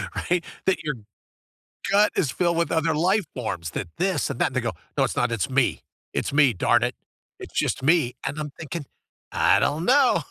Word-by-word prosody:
right? 175 Hz, -1 st, 0 dB, 0.2 s
That 190 Hz, -, +1 dB
your 150 Hz, -3 st, -2 dB, 1.0 s
gut 205 Hz, +1 st, +4 dB
is 145 Hz, -, +1 dB
filled 170 Hz, +3 st, 0 dB
with 170 Hz, 0 st, +1 dB
other 160 Hz, 0 st, +1 dB
life 185 Hz, +7 st, +2 dB
forms, 85 Hz, -9 st, -4 dB
that 85 Hz, -, -4 dB
"this" 180 Hz, -6 st, 0 dB
and 135 Hz, -, -4 dB
"that" -, -, +3 dB
and 130 Hz, -, -9 dB
they -, -, +3 dB
go, 115 Hz, -3 st, -2 dB, 0.2 s
"No, -, -, +3 dB
it's -, -, -2 dB
not, 125 Hz, -1 st, +1 dB
it's 110 Hz, -3 st, -1 dB
me. 130 Hz, -1 st, +2 dB, 0.3 s
It's -, -, -1 dB
me, 145 Hz, -3 st, +5 dB
darn 115 Hz, +4 st, +2 dB
it. 125 Hz, 0 st, 0 dB, 0.4 s
It's -, -, -10 dB
just -, -, 0 dB
me," 150 Hz, -4 st, +3 dB
and 140 Hz, -, -3 dB
I'm 150 Hz, -1 st, -4 dB
thinking, 160 Hz, -1 st, -6 dB, 0.5 s
"I -, -, +4 dB
don't 155 Hz, +4 st, 0 dB
know?" 265 Hz, +2 st, +4 dB
150 Hz, 205 wpm, -24 LUFS, 125-175 Hz, 1.0 s, me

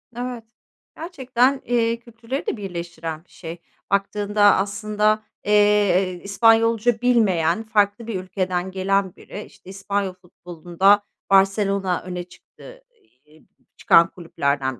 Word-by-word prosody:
Evet. 245 Hz, -1 st, -5 dB, 0.5 s
Gerçekten, 265 Hz, -5 st, 0 dB
eee, 230 Hz, -1 st, 0 dB
kültürleri 235 Hz, +3 st, -7 dB
de -, -, -2 dB
birleştiren 170 Hz, -4 st, -6 dB
bir -, -, -37 dB
şey. 165 Hz, -1 st, -9 dB, 0.3 s
Baktığında 205 Hz, +1 st, 0 dB
aslında, 210 Hz, +2 st, 0 dB, 0.2 s
eee, 205 Hz, -3 st, +3 dB
İspanyolca 225 Hz, +2 st, +3 dB
bilmeyen, 210 Hz, -7 st, +2 dB
farklı 215 Hz, 0 st, 0 dB
bir 215 Hz, -5 st, -3 dB
ülkeden 185 Hz, -1 st, -3 dB
gelen 190 Hz, 0 st, 0 dB
biri, 205 Hz, -, -9 dB
işte, -, -, -17 dB
İspanyol 195 Hz, 0 st, -3 dB
futbolunda 180 Hz, +2 st, 0 dB, 0.3 s
Barselona 195 Hz, -1 st, +2 dB
öne 180 Hz, -1 st, -6 dB
çıktı -, -, -16 dB
ey 415 Hz, -, -36 dB
eee, 155 Hz, +1 st, -22 dB, 0.3 s
çıkan 165 Hz, 0 st, +5 dB
kulüplerden 140 Hz, -, -2 dB
200 Hz, 115 wpm, -22 LUFS, 180-225 Hz, 0.5 s, çıkan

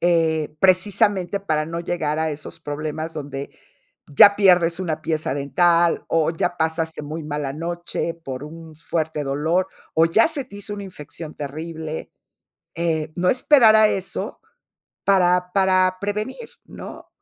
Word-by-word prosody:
Eh, 160 Hz, -3 st, +1 dB
precisamente 195 Hz, 0 st, +3 dB
para 155 Hz, -5 st, -1 dB
no 165 Hz, +1 st, -4 dB
llegar 160 Hz, -3 st, -2 dB
a 160 Hz, 0 st, 0 dB
esos 150 Hz, +3 st, -7 dB
problemas 155 Hz, +2 st, -5 dB
donde 140 Hz, -2 st, -6 dB, 0.6 s
ya 200 Hz, +8 st, +7 dB
pierdes 180 Hz, -3 st, +4 dB
una 160 Hz, -4 st, -3 dB
pieza 155 Hz, -4 st, -2 dB
dental 170 Hz, +4 st, +2 dB
o 165 Hz, -1 st, +2 dB
ya 170 Hz, +1 st, -2 dB
pasaste 160 Hz, 0 st, -1 dB
muy 155 Hz, +2 st, -6 dB
mala 145 Hz, -2 st, -3 dB
noche 170 Hz, +1 st, -3 dB
por 135 Hz, -5 st, -7 dB
un 160 Hz, +1 st, -11 dB
fuerte 160 Hz, -1 st, -3 dB
dolor, 160 Hz, +7 st, 0 dB, 0.3 s
o 165 Hz, +1 st, +4 dB
ya 215 Hz, +7 st, +4 dB
se 305 Hz, -4 st, -1 dB
te 200 Hz, -5 st, -12 dB
hizo 205 Hz, +1 st, -6 dB
una 200 Hz, -, -6 dB
infección 155 Hz, -3 st, -9 dB
terrible. 160 Hz, +2 st, -6 dB, 0.6 s
Eh, 160 Hz, -2 st, -1 dB
no 180 Hz, +1 st, +1 dB
esperar 250 Hz, -4 st, +5 dB
a 215 Hz, 0 st, +6 dB
eso 190 Hz, -2 st, -4 dB, 0.6 s
para 180 Hz, -2 st, +3 dB
para 185 Hz, -1 st, +3 dB
prevenir, 215 Hz, -, -4 dB
¿no? -, -, -10 dB
165 Hz, 145 wpm, -22 LUFS, 155-185 Hz, 0.6 s, ya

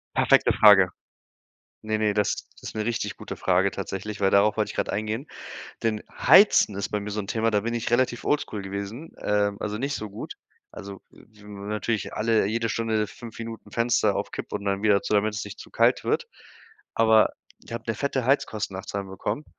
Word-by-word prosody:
Perfekte -, -, +4 dB
Frage. 95 Hz, -4 st, +7 dB, 0.9 s
Ne, 110 Hz, 0 st, -1 dB
ne, 105 Hz, -1 st, +2 dB
das 105 Hz, -1 st, 0 dB
das -, -, -24 dB
ist -, -, -13 dB
'ne 110 Hz, -, -1 dB
richtig 120 Hz, 0 st, -2 dB
gute -, -, -7 dB
Frage 95 Hz, +1 st, +2 dB
tatsächlich, 100 Hz, +2 st, -5 dB
weil 95 Hz, -1 st, +2 dB
darauf 105 Hz, +2 st, +4 dB
wollte 110 Hz, -, 0 dB
ich -, -, -13 dB
gerade -, -, -1 dB
eingehen. 110 Hz, +7 st, -3 dB, 0.6 s
Denn 110 Hz, -2 st, 0 dB
Heizen 195 Hz, -, +6 dB
ist 100 Hz, 0 st, -3 dB
bei 105 Hz, -, -1 dB
mir 105 Hz, -, -6 dB
so 105 Hz, +1 st, -2 dB
'n 100 Hz, -, -6 dB
Thema, 115 Hz, +2 st, 0 dB
da 105 Hz, -, +2 dB
bin 115 Hz, +3 st, -3 dB
ich 120 Hz, -1 st, -2 dB
relativ 120 Hz, 0 st, +1 dB
oldschool 145 Hz, -8 st, 0 dB
gewesen, 100 Hz, +9 st, -6 dB
ähm, 105 Hz, -1 st, +1 dB
also, 105 Hz, +1 st, -3 dB
nicht 140 Hz, +4 st, -2 dB
so 110 Hz, -4 st, -5 dB
gut. 100 Hz, -, -7 dB, 0.4 s
Also, 100 Hz, -1 st, -9 dB
n 105 Hz, -1 st, -12 dB
natürlich 105 Hz, 0 st, -2 dB
alle 110 Hz, 0 st, +2 dB
jede 115 Hz, +3 st, -1 dB
Stunde 110 Hz, -2 st, 0 dB
5 115 Hz, +2 st, -11 dB
Minuten 115 Hz, -1 st, -8 dB
Fenster 115 Hz, -3 st, +2 dB
auf 100 Hz, 0 st, -3 dB
Kipp -, -, -7 dB
und 100 Hz, -1 st, -4 dB
dann 100 Hz, +1 st, 0 dB
wieder 100 Hz, -2 st, +4 dB
zu, 105 Hz, -, -2 dB
damit 105 Hz, +1 st, +2 dB
es 105 Hz, -, -3 dB
nicht 100 Hz, -, -9 dB
zu -, -, -11 dB
kalt -, -, +2 dB
wird. -, -, 0 dB, 0.7 s
Aber 110 Hz, -1 st, +5 dB, 0.3 s
ich -, -, -11 dB
habe 115 Hz, -1 st, -5 dB
'ne 115 Hz, -, -1 dB
fette 130 Hz, +1 st, -2 dB
Heizkostennachzahlung 100 Hz, -7 st, -1 dB
bekommen, 105 Hz, +8 st, -4 dB
105 Hz, 200 wpm, -25 LUFS, 100-115 Hz, 0.9 s, Frage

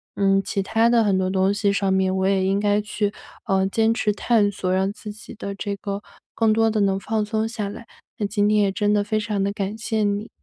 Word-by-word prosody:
嗯， 195 Hz, 0 st, +3 dB
其 195 Hz, -, -1 dB
他 225 Hz, +4 st, +2 dB
的 235 Hz, -1 st, +4 dB
很 200 Hz, -3 st, +2 dB
多 190 Hz, 0 st, 0 dB
东 190 Hz, 0 st, +2 dB
西 200 Hz, 0 st, +1 dB
上 195 Hz, -1 st, 0 dB
面， 190 Hz, 0 st, +1 dB
我 190 Hz, 0 st, +1 dB
也 195 Hz, -1 st, +2 dB
应 195 Hz, +1 st, +1 dB
该 205 Hz, 0 st, +2 dB
去， 210 Hz, 0 st, -2 dB, 0.3 s
呃， 190 Hz, 0 st, +2 dB
坚 225 Hz, +2 st, +2 dB
持 220 Hz, -2 st, 0 dB
探 205 Hz, 0 st, +2 dB
索 185 Hz, -2 st, -3 dB
让 190 Hz, +2 st, +1 dB
自 210 Hz, 0 st, -8 dB
己 210 Hz, -, -11 dB
的 200 Hz, -2 st, -6 dB
这 200 Hz, +1 st, -3 dB
个 200 Hz, +1 st, -5 dB, 0.3 s
更 225 Hz, -1 st, +3 dB
多 225 Hz, 0 st, +3 dB
地 215 Hz, -1 st, 0 dB
能 195 Hz, -1 st, +2 dB
放 215 Hz, +1 st, -1 dB
松 220 Hz, +1 st, -1 dB
下 220 Hz, -3 st, -3 dB
来。 225 Hz, +3 st, -9 dB, 0.3 s
那 205 Hz, -, 0 dB
今 205 Hz, 0 st, +1 dB
天 210 Hz, 0 st, +3 dB
也 200 Hz, -1 st, +2 dB
真 205 Hz, +1 st, +1 dB
的 205 Hz, -1 st, +2 dB
非 215 Hz, +1 st, -1 dB
常 210 Hz, -2 st, -1 dB
地 200 Hz, -, 0 dB
感 200 Hz, 0 st, -3 dB
谢 220 Hz, -1 st, -1 dB
你。 205 Hz, +1 st, -1 dB
205 Hz, 265 characters per minute, -23 LUFS, 195-215 Hz, 0.3 s, 的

